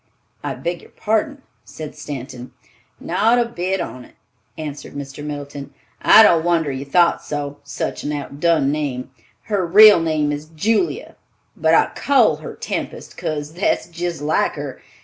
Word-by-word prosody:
"I - - -3
beg 170 0 -4
your - - -17
pardon," 265 +6 -1 0.2
said 155 -2 -9
Stanton. 130 -4 -8 0.5
"Not 230 +3 +2
a 240 - +3
bit 190 -4 -2
on't," 130 -7 -7 0.4
answered 150 -2 -7
Mr. 140 0 -7
Middleton. 145 -1 -7 0.3
"I 220 - +8
don't 170 -6 +5
wonder 165 -4 +1
you 135 +1 -5
thought 170 +5 +3
so, 145 -1 -5
such 140 - -4
an 145 - -2
oudun 145 0 0
name! 140 -4 -3 0.3
Her 205 -3 -1
real 205 +3 +8
name 155 -2 0
is 145 +1 -5
Julia, 225 - 0 0.4
but - - +3
I - - +3
call 245 - +3
her 155 - -9
Tempest, - - -5
'case 150 -1 -4
that's 180 +5 0
jist 170 -2 -4
like 155 +1 +1
her. - - -7
155 Hz, 150 wpm, -20 LUFS, 145-180 Hz, 0.5 s, I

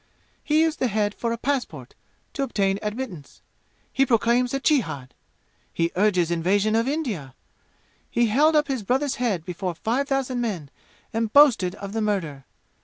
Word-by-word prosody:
He 310 +1 +3
used 320 -1 +1
the 255 - +2
head 210 -1 0
for 230 +1 -3
a 230 - -2
passport, 270 +1 -3 0.4
to 280 - -3
obtain 200 -7 0
admittance. 210 - -6 0.5
He 270 - +3
proclaims 240 0 +2
a 275 - -1
jihad! 245 - 0 0.6
He 170 0 0
urges 180 -3 +2
invasion 195 +6 +1
of 230 +2 +1
India! 220 - -3 0.7
He 235 0 +2
held 295 +8 +3
up 300 -1 +3
his 265 -4 -2
brother's 260 +6 0
head 195 -10 0
before 180 0 -4
five 245 - -1
thousand 270 -3 -1
men 180 - -4 0.4
and 225 -1 -1
boasted 225 -11 +5
of 200 0 -8
the 225 - -1
murder. 165 -10 -2
225 Hz, 160 wpm, -24 LUFS, 190-265 Hz, 0.7 s, boasted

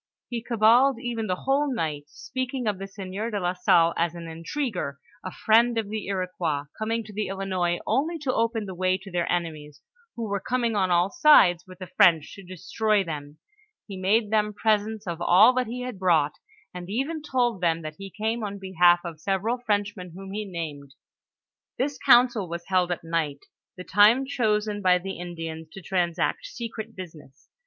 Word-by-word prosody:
He 235 -2 -3
cabaled 235 +3 +4
even 235 -3 -3
the 185 - 0
whole 275 +1 +1
night, 155 - -3
speaking 255 - -5
of 205 -3 -1
the 195 - -5
sieur 195 +2 -5
de 210 -3 -2
la 180 -1 -1
Salle 170 -2 +3
as 170 0 0
an 170 -1 -8
intriguer, 165 - -4 0.2
a 185 - -5
friend 230 +4 +3
of 220 -3 -2
the 215 -2 -4
Iroquois, 180 -6 -2
coming 225 +1 -2
to 210 0 -12
the 210 +1 -2
Ilinois 185 -3 -1
only 325 +5 0
to 280 -5 -2
open 225 -1 0
the 190 - -6
way 185 +1 +1
to 190 +1 -12
their 175 -1 -1
enemies, 155 -4 -4 0.4
who 235 - -4
were 200 -1 -1
coming 240 0 -1
on 190 -2 +1
all 175 +2 +2
sides 295 - +5
with 185 0 -12
the 185 - -7
French 170 -4 +3
to 195 - -11
destroy 195 +3 0
them; 150 -3 -7 0.5
he 200 - -8
made 205 +3 +1
them 210 -1 +1
presents 215 0 0
of 170 -2 -5
all 195 +8 +6
that 255 -1 0
he 245 +2 -5
had 250 -6 -6
brought, 165 -6 +3 0.4
and 180 0 -8
even 275 +9 -2
told 245 -8 0
them 165 -2 +1
that 155 0 -7
he 195 0 -7
came 220 +3 -2
on 200 -1 -4
behalf 175 -2 +3
of 165 -2 -7
several 200 +7 -1
Fi'enchmen 205 -6 -2
whom 195 0 -9
he 210 +1 -4
named. 150 -7 -7 0.8
This 280 +2 -2
council 240 -6 +4
was 170 0 -6
held 180 -2 +2
at 175 - -3
night, 165 -4 -2 0.3
the 180 - -7
time 210 +9 +5
chosen 215 -6 0
by 180 -2 +4
the 190 0 -6
In 175 -1 -7
dians 160 -1 -6
to 195 - -9
transact 180 - -1
secret 230 - -7
business. 155 -7 -12
195 Hz, 190 wpm, -25 LUFS, 175-225 Hz, 0.8 s, all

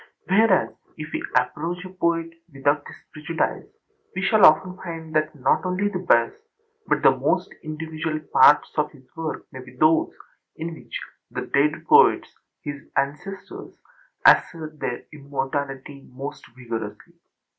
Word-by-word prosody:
Whereas 195 0 +4 0.3
if 155 -1 -7
we - - -2 0.2
approach 175 +4 -1
a - - -7
poet 170 -2 -1 0.2
without 145 +1 +1
his - - -10 0.2
prejudice 155 +2 -2 0.5
we 190 - -2
shall 200 +1 +4
often 185 +4 +3
find 165 -3 -7
that 155 0 +1
not 135 -2 +1
only 185 +2 0
the 185 - -3
best, 120 -10 +3 0.5
but - - +1
the - - +6
most - - 0
individual 155 0 -4
parts 150 0 +6
of 150 0 +1
his 140 -3 -18
work 160 -1 -4
may 130 - -9
be 125 0 -15
those 155 +5 +3 0.5
in 165 +1 -5
which 160 - -7 0.3
the - - -4
dead 150 +3 +1
poets, - - +5 0.3
his 145 -1 -5 0.2
ancestors, 150 +8 -4 0.5
assert 155 -2 +4
their 120 -2 -3
immortality 140 -1 -5
most 135 +3 -7
vigorously. 115 -4 -6
155 Hz, 140 wpm, -24 LUFS, 140-170 Hz, 0.5 s, the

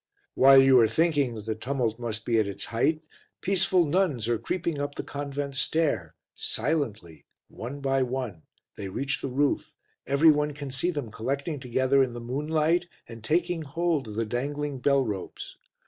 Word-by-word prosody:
While 135 0 +7
you 135 -1 +6
are 115 - +6
thinking 145 -1 +1
that 105 -2 -8
the 110 - -1
tumult 120 0 -2
must 115 -2 -4
be 115 -2 +2
at 105 - +1
its 100 0 -5
height, 155 +7 +1 0.4
peaceful 185 -2 +3
nuns 150 - +1
are 120 -2 +1
creeping 170 -4 -2
up 145 0 -3
the - - -4
convent 140 0 -4
stair, 135 - 0 0.2
silently, 110 - -3 0.2
one 135 +5 -7
by 135 -1 +1
one, 125 -9 -3 0.4
they 100 -2 -5
reach 135 +7 -2
the 135 - -3
roof, 140 +3 0 0.3
every 140 +4 +6
one 150 0 0
can 145 -1 -7
see 135 +7 0
them 145 -10 -4
collecting 140 +7 -3
together 130 +2 +2
in 130 -2 +1
the 120 - -6
moonlight 155 +7 0 0.2
and 115 -2 -11
taking 170 +5 0
hold 155 -2 -1
of 105 - -7
the 115 +1 0
dangling 140 +4 -3
bell 140 +1 +3
ropes. 100 -4 -6
135 Hz, 175 wpm, -27 LUFS, 115-150 Hz, 0.4 s, While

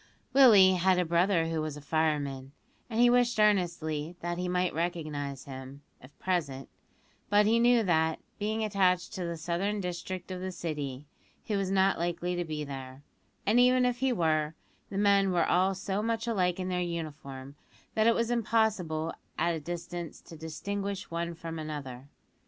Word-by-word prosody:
Willie 215 -9 +8
had 185 +1 +3
a 180 - +2
brother 170 0 +2
who 160 -1 -1
was 155 -1 -4
a - - -7
fireman, 145 -3 -1 0.4
and 225 -1 -2
he 245 - +7
wished 240 -1 +3
earnestly 170 -6 +1
that 175 0 -3
he 180 - -2
might 180 0 0
recognise 155 -5 -3
him, 135 +1 -9 0.2
if 130 +3 -16
present; 150 -8 -2 0.6
but 205 0 +5
he 225 +2 +4
knew 240 -1 +5
that, 160 -4 +2 0.2
being 215 +2 -1
attached 185 -4 +1
to 185 - -4
the 170 -1 -4
southern 175 +6 -1
district 180 0 -5
of 180 -1 -5
the 185 0 -3
City, 150 -6 -5 0.4
he 210 - -2
was 195 -1 0
not 195 -1 +3
likely 175 +1 -1
to 175 - -1
be 155 -2 -4
there, 135 -1 -8 0.4
and 225 +4 +4
even 250 0 +5
if 245 -1 +1
he 265 0 +2
were, 160 -6 +1 0.3
the 195 - -5
men 200 -1 +4
were 175 -2 +2
all 190 +2 +2
so 190 +2 -2
much 225 +1 -1
alike 185 -6 0
in 185 0 -2
their 180 -1 0
uniform, 145 -6 -5 0.4
that 220 0 +3
it 230 - +5
was 235 0 0
impossible 200 -9 0 0.2
at 170 +2 +1
a 165 - -3
distance 175 +1 -6
to 165 - -13
distinguish 195 +5 -4
one 170 0 -3
from 165 0 -6
another. 140 -4 -6
175 Hz, 175 wpm, -29 LUFS, 155-200 Hz, 0.6 s, Willie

